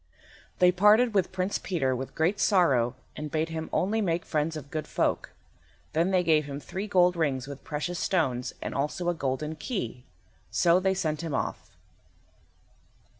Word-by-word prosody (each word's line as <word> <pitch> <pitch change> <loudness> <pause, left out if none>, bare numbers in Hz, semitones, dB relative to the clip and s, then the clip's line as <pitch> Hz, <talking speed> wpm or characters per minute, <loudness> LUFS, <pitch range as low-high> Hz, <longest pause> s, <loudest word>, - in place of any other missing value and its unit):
They 180 0 +6
parted 210 +6 +5
with 195 -3 +1
Prince 190 +1 -1
Peter 135 -8 0
with 130 +1 -6
great 175 +6 +1
sorrow, 135 - +3 0.2
and 150 0 -5
bade 160 +2 -1
him 160 0 -4
only 215 +4 +1
make 175 -3 0
friends 155 +1 -1
of 140 -2 -10
good 155 -1 -3
folk. - - 0 0.6
Then 165 +4 +2
they 185 -2 +2
gave 155 -3 +3
him 140 0 -5
three 190 +8 -5
gold 180 -3 +4
rings 140 -6 0
with 140 0 -9
precious 160 +4 -3
stones, 130 -9 0
and - - -4
also 150 +5 -1
a - - +2
golden 150 0 -2
key. 150 - -4 0.5
So 175 +1 +4
they 190 0 +1
sent 155 -5 -1
him 160 -4 -3
off. - - -3
165 Hz, 170 wpm, -28 LUFS, 145-185 Hz, 0.6 s, They